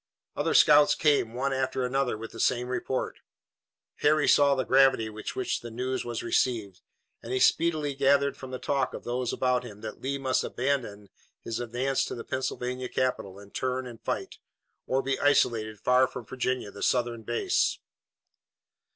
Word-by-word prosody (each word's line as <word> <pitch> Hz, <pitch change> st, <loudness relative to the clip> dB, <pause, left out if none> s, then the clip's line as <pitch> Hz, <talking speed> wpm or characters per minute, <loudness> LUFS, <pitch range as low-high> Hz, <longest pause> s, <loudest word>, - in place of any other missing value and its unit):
Other -, -, 0 dB
scouts 150 Hz, 0 st, +6 dB
came, 140 Hz, -7 st, +2 dB
one 135 Hz, +2 st, -1 dB
after 130 Hz, -1 st, -1 dB
another, 130 Hz, -2 st, 0 dB
with 115 Hz, +1 st, -8 dB
the 115 Hz, -, -10 dB
same 125 Hz, +1 st, +1 dB
report. 130 Hz, 0 st, -3 dB, 0.8 s
Harry 150 Hz, 0 st, +3 dB
saw 140 Hz, -1 st, +5 dB
the 130 Hz, -, 0 dB
gravity 130 Hz, -5 st, +4 dB
with 110 Hz, 0 st, -6 dB
which 130 Hz, -, -1 dB
the 120 Hz, -, -8 dB
news 130 Hz, +3 st, -3 dB
was 120 Hz, -1 st, -4 dB
received, 105 Hz, -7 st, 0 dB, 0.4 s
and 115 Hz, -, -8 dB
he 130 Hz, -, +1 dB
speedily 155 Hz, -1 st, +2 dB
gathered 140 Hz, +1 st, +2 dB
from 130 Hz, -, -9 dB
the 130 Hz, -, -4 dB
talk 135 Hz, -1 st, -1 dB
of -, -, -8 dB
those 125 Hz, 0 st, -2 dB
about 125 Hz, -1 st, +1 dB
him 105 Hz, -4 st, -11 dB
that 110 Hz, -1 st, -7 dB
Lee 140 Hz, +1 st, -2 dB
must 130 Hz, -1 st, 0 dB
abandon 120 Hz, -7 st, -2 dB, 0.3 s
his 115 Hz, -, -4 dB
advance 125 Hz, +3 st, -1 dB
to -, -, -5 dB
the 115 Hz, -, -7 dB
Pennsylvania 125 Hz, -1 st, -3 dB
capital 125 Hz, -7 st, -2 dB
and 100 Hz, 0 st, -14 dB
turn 130 Hz, 0 st, -2 dB
and 120 Hz, -2 st, -10 dB
fight, -, -, -4 dB, 0.5 s
or 135 Hz, +1 st, +1 dB
be 135 Hz, 0 st, -1 dB
isolated 110 Hz, -7 st, +2 dB
far 125 Hz, +1 st, +4 dB
from 125 Hz, -2 st, -8 dB
Virginia, 125 Hz, -3 st, -2 dB
the 100 Hz, -, -11 dB
Southern 120 Hz, -2 st, 0 dB
base. 120 Hz, +2 st, 0 dB
125 Hz, 170 wpm, -28 LUFS, 115-135 Hz, 0.8 s, scouts